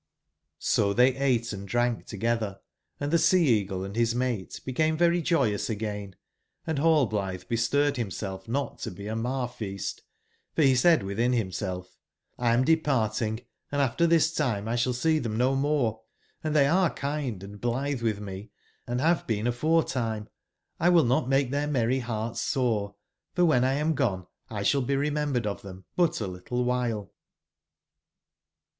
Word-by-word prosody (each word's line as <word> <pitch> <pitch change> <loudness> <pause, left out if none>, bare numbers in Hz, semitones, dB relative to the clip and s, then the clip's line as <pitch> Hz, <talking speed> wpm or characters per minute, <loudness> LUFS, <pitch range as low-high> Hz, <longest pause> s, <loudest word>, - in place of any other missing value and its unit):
O 100 -1 +2
tbey 130 +2 +4
ate 120 -5 +1
and 100 0 -7
drank 120 +2 0
togetber, 110 -2 -1 0.4
and 145 +1 -2
tbe 170 - +4
Sea 180 -1 +4
eagle 100 -5 +1
and 100 +1 -6
bis 115 +1 +1
mate 120 -6 -2
became 155 +5 +1
very 175 +1 +3
joyous 135 - +1
again, 105 -3 -4 0.5
and 160 -3 -1
Rallblitbe 110 - +1
bestirred 140 +5 +2
bimself 95 -3 -4
not 135 +2 -2
to - - -4
be 100 +3 -9
a 110 +1 -3
mar/feast; 115 -5 -3 0.5
for - - +2
be 135 -2 +6
said 155 +4 +5
witbin 115 +6 0
bimself: 95 -3 -2 0.5
''X 120 -1 +3
am 125 +2 +3
de 160 +2 +5
parting, 110 -6 0 0.3
andaftertbistimelsball 140 -2 +1
seetbem 110 -1 -2
nomore; 135 -2 +1 0.4
and 155 -1 -1
tbey 140 -2 +5
are 185 -2 +4
kind 140 -9 -3
and 100 +1 -10
blitbe 130 +3 -1
witb 110 -3 -1
me, 100 +1 -7 0.4
and 120 +1 -1
bave 165 +3 +2
been 110 -1 -1
aforetime; 120 -5 0 0.5
X 175 +3 +4
will 170 -2 +6
not 125 +1 +1
make 135 -1 +2
tbeir 145 +1 0
merry 130 -2 +1
bearts 115 -2 -3
sore, 110 -6 0 0.4
for 180 - +3
wben 155 -8 +4
X 135 +2 +1
am 155 +2 +1
gone 100 - -1 0.2
X 100 -3 0
sball 140 -2 +2
be 140 - +1
remembered 145 -4 0
of 100 -1 -3
tbem 95 -1 -10
but 170 -2 +2
a 110 - -2
little 95 +7 -3
wbile." 120 -5 -1
120 Hz, 150 wpm, -27 LUFS, 105-145 Hz, 0.5 s, be